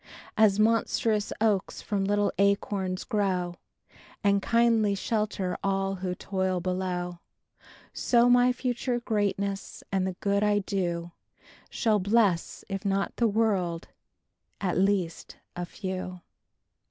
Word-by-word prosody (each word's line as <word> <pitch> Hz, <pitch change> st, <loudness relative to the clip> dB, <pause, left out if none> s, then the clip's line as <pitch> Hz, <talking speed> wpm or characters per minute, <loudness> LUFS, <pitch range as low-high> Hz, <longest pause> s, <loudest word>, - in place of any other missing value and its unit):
As 215 Hz, -2 st, +4 dB
monstrous 220 Hz, -1 st, +2 dB
oaks 210 Hz, -3 st, +1 dB
from 200 Hz, -2 st, -1 dB
little 205 Hz, +1 st, +1 dB
acorns 200 Hz, -2 st, +1 dB
grow, 185 Hz, -4 st, -1 dB, 0.7 s
And 200 Hz, -1 st, +3 dB
kindly 230 Hz, -2 st, +3 dB
shelter 210 Hz, -3 st, -1 dB
all 195 Hz, 0 st, 0 dB
who 180 Hz, -1 st, -3 dB
toil 190 Hz, -1 st, -1 dB
below, 180 Hz, -1 st, -3 dB, 0.7 s
So 240 Hz, -1 st, +3 dB
my 245 Hz, 0 st, +5 dB
future 245 Hz, 0 st, -1 dB
greatness 200 Hz, -3 st, -2 dB
and 190 Hz, -1 st, +1 dB
the 190 Hz, -, -2 dB
good 200 Hz, +2 st, 0 dB
I 210 Hz, 0 st, +3 dB
do 175 Hz, -4 st, -2 dB, 0.6 s
Shall 215 Hz, -3 st, +1 dB
bless, 200 Hz, -3 st, +1 dB
if 195 Hz, -1 st, -4 dB
not 195 Hz, -1 st, -1 dB
the 235 Hz, -, +3 dB
world, 200 Hz, -6 st, 0 dB, 0.7 s
at 185 Hz, -3 st, -1 dB
least 185 Hz, -3 st, 0 dB, 0.2 s
a 175 Hz, 0 st, -4 dB
few." 185 Hz, -1 st, -5 dB
200 Hz, 115 wpm, -28 LUFS, 185-215 Hz, 0.7 s, my